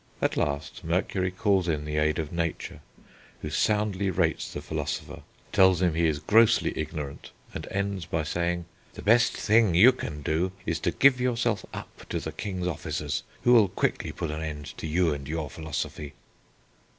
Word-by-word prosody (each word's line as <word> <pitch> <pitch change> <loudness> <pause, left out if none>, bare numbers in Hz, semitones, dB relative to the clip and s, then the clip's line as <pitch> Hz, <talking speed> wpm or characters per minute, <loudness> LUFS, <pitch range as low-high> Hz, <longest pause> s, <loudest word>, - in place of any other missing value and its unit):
At - - 0
last 70 0 -2
Mercury 90 +2 0
calls 95 -1 +1
in 75 -3 -1
the 75 0 -3
aid 75 0 +2
of 80 -3 -3
Nature, 85 -1 -3 0.6
who 75 - -4
soundly 100 +2 +1
rates 85 -3 0
the - - -5
philosopher, - - -4 0.3
tells 95 -3 +5
him 90 -3 +2
he 85 +1 +2
is 75 -2 0
grossly 110 +8 +4
ignorant, 75 -2 -5 0.2
and - - -6
ends 100 -3 -2
by 80 -1 -1
saying: 85 +2 -1 0.3
"The - - -8
best 115 +3 +4
thing 110 -4 +3
you 110 +9 +8
can 75 - -6
do 85 +6 0
is 80 -1 -1
to - - 0
give 135 -2 +4
yourself 120 -4 0
up - - -10
to - - -1
the - - -5
king's 95 -3 -4
officers, 90 -5 -2 0.2
who 120 - +5
will 110 -4 +7
quickly - - -1
put 80 - -4
an 75 +1 -4
end 75 -2 -6
to - - -4
you 80 0 +2
and 70 -2 -6
your 75 -2 -3
philosophy." 75 -1 -5
85 Hz, 175 wpm, -27 LUFS, 80-100 Hz, 0.6 s, you